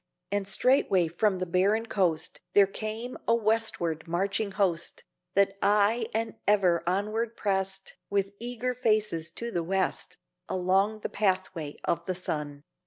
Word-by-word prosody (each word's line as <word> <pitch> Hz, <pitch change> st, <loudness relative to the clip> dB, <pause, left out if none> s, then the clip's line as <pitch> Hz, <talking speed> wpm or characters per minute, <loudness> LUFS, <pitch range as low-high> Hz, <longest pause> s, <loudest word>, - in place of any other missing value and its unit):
And 205 Hz, -1 st, 0 dB
straightway 195 Hz, -5 st, +3 dB
from 190 Hz, +4 st, +1 dB
the 185 Hz, -, -2 dB
barren 195 Hz, +6 st, +2 dB
coast 175 Hz, -7 st, 0 dB
There 200 Hz, -, +8 dB
came 220 Hz, +5 st, -5 dB
a 230 Hz, -, +5 dB
westward 215 Hz, -8 st, 0 dB
marching 195 Hz, +5 st, 0 dB
host, 180 Hz, -4 st, -1 dB, 0.3 s
That 200 Hz, 0 st, +3 dB
aye 210 Hz, +3 st, +3 dB
and 225 Hz, 0 st, -2 dB
ever 190 Hz, -5 st, +4 dB
onward 215 Hz, +5 st, -1 dB
prest 195 Hz, -1 st, -2 dB
With 200 Hz, 0 st, 0 dB
eager 245 Hz, +1 st, -2 dB
faces 215 Hz, -9 st, +1 dB
to 235 Hz, +8 st, -5 dB
the 175 Hz, -5 st, -1 dB
West, 190 Hz, +1 st, -1 dB, 0.3 s
Along 195 Hz, +4 st, +1 dB
the -, -, -3 dB
pathway 185 Hz, -6 st, -1 dB
of 170 Hz, 0 st, 0 dB
the 185 Hz, -, -1 dB
sun. 150 Hz, -5 st, -4 dB
195 Hz, 140 wpm, -28 LUFS, 180-220 Hz, 0.3 s, There